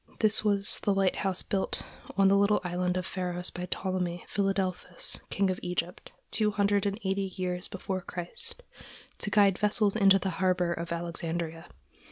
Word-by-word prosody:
This 215 -1 +4
was 200 -2 +5
the 200 - +1
lighthouse 190 -1 +3
built 195 -1 -2 0.3
on 195 -1 +5
the 195 - +5
little 200 +1 +3
island 180 0 -1
of 185 - -2
Pharos 180 -2 -4
by 180 0 -6
Ptolemy 180 -2 -2
Philadelphus, 190 -3 -1
king 195 -1 +1
of 185 - -4
Egypt, 180 0 -4 0.2
two 215 -1 +2
hundred 205 -1 +1
and 200 +2 -3
eighty 195 0 -1
years 180 0 -2
before 190 -1 -4
Christ, 175 - -7 0.6
to - - 0
guide 200 -2 +4
vessels 210 -1 +2
into 195 -3 +6
the 190 0 -2
harbor 180 -2 +2
of 170 +1 -6
Alexandria. 170 -1 -3
190 Hz, 160 wpm, -29 LUFS, 180-200 Hz, 0.6 s, into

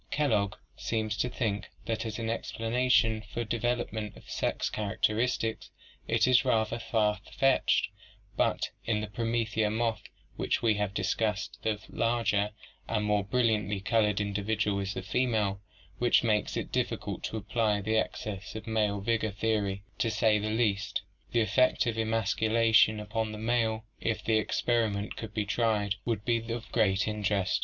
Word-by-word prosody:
Kellogg 105 -10 +1 0.2
seems 110 -1 -1
to 125 - 0
think 105 -4 -2 0.2
that 115 0 -2
as 110 - -4
an 115 - -3
explana 115 +2 -1
tion 110 -3 +4
for 110 +2 -5
the - - -2
development 110 -2 -2
of - - -16
sex - - -1
characteristics 110 +2 -1 0.4
it 115 -1 +3
is 130 +2 +5
rather 115 -2 +1
far 105 -3 +1 0.2
fetched, 135 -1 +3 0.5
but - - +1
in 110 -2 0
the - - -2
promethea 115 -1 0
moth 115 +1 0 0.4
which - - 0
we 115 -2 +4
have 105 -2 -2
discussed 105 +2 -1
the 110 -2 -1
larger 115 -3 +1 0.4
and 105 -2 0
more 105 -1 +2
brilliantly 105 -3 +1
colored 105 -1 +2
individual 105 0 0
is 95 0 -3
the 95 - -4
female, 105 -4 0 0.4
which 120 0 +4
makes 105 -3 +1
it - - -4
difficult - - -2
to 110 - -3
apply 105 0 0
the 110 +2 -1
excess 105 -2 -3
of 110 -1 -6
male 105 -3 0
vigor 110 +1 +1
theory, 105 -2 -1 0.2
to 115 - +2
say 110 -1 +3
the 105 +1 -2
least. 105 -3 0 0.3
The 120 - +3
effect 125 +3 +3
of 115 -1 -1
emasculation 110 0 +3
upon 110 +1 -2
the 110 - -6
male 110 -1 0
if 115 -1 -1
the 110 -1 +2
experi 115 -3 +1
ment 100 +1 -4
could 110 -2 -7
be 105 -2 0
tried 105 -2 +1
would 110 -3 -1
be 115 -1 0
of 115 -1 -5
great 95 -4 +2
interest. 105 -3 0
110 Hz, 160 wpm, -29 LUFS, 105-115 Hz, 0.5 s, is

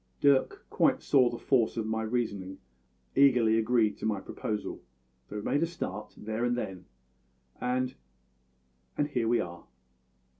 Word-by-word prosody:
"Dirk 140 -2 +3
quite - - +2
saw 125 -3 +4
the 120 - -5
force 120 -4 +1
of 115 - -1
my 110 0 -1
reasoning 110 -5 -2 0.6
and 140 - +6
eagerly 120 -5 +5
agreed 110 -1 +2
to - - -12
my 105 -3 0
proposal; 105 +2 -4 0.5
so - - -7
we 105 - -4
made 145 - +1
a 165 - +2
start 135 - -5
there 110 +2 -3
and 120 0 +1
then, 95 -6 -5 0.7
and 125 +1 0 1.0
and 145 0 +1
here 120 -5 0
we 120 +1 +3
are." 85 -1 -5
115 Hz, 155 wpm, -30 LUFS, 105-125 Hz, 1.0 s, and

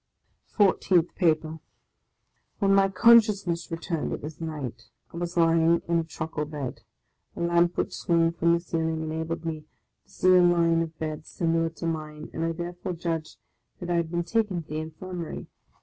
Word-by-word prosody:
FOURTEENTH 185 -4 +2
PAPER 160 -2 +1 1.0
WHEN 195 -1 +3
my 195 0 +4
consciousness 205 -6 +4
returned 165 -1 -3
it - - -5
was 150 +2 -8
night; 130 -8 -6 0.2
I - - -7
was 175 0 -4
lying 165 0 +4
on 170 0 +2
a - - 0
truckle 160 -1 -4
bed; 145 -4 -6 0.5
a - - -6
lamp 170 0 +2
which - - -1
swung 165 -1 +2
from 170 0 +2
the 170 - +2
ceiling 160 -2 -2
enabled 160 +1 -4
me 155 -2 -4 0.4
to - - -33
see 185 0 +3
a 180 - +7
line 170 -1 +4
of 165 -1 -5
beds 155 -1 -5
similar 165 -1 0
to 165 +1 -8
mine, 155 -1 -4
and 165 - -3
I 165 - 0
therefore 175 +2 -5
judged 165 -2 -4 0.4
that 175 -1 -4
I 175 - +2
had 170 -1 0
been 170 0 -1
taken 190 -2 0
to - - -29
the 155 +1 -3
Infirmary. 165 +2 -6
165 Hz, 175 wpm, -26 LUFS, 160-175 Hz, 1.0 s, a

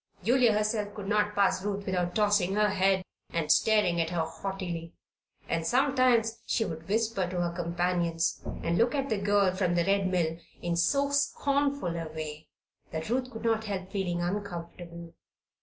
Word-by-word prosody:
Julia 240 +1 +4
herself 210 -1 -1
could 205 -2 -6
not 210 0 +1
pass 195 -1 +2
Ruth 200 -1 -3
without 180 -2 -1
tossing 205 -3 +2
her 210 0 +3
head 190 -1 +2 0.3
and 155 -2 0
staring 210 -6 +3
at 165 - -1
her 170 -2 0
haughtily; 170 0 -5 0.5
and 165 -1 -1
sometimes 245 -1 +2
she 225 - +1
would 165 -1 -7
whisper 215 -3 +1
to 180 -1 -3
her 175 -1 0
companions 170 -1 -1 0.2
and 170 +1 +1
look 240 +4 +3
at 275 -1 -1
the 215 -3 0
girl 200 -2 +2
from 180 -2 +1
the 170 -1 +2
Red 195 0 +2
Mill 165 -3 0 0.2
in 170 0 -1
so 280 - +2
scornful 280 -7 +1
a 165 -1 -4
way 155 0 -6 0.4
that 160 +6 -4
Ruth 255 +1 0
could 225 -3 -9
not 225 -1 +1
help 190 -2 -4
feeling 180 -4 -1
uncomfortable. 170 -3 -5
195 Hz, 170 wpm, -29 LUFS, 170-215 Hz, 0.5 s, Julia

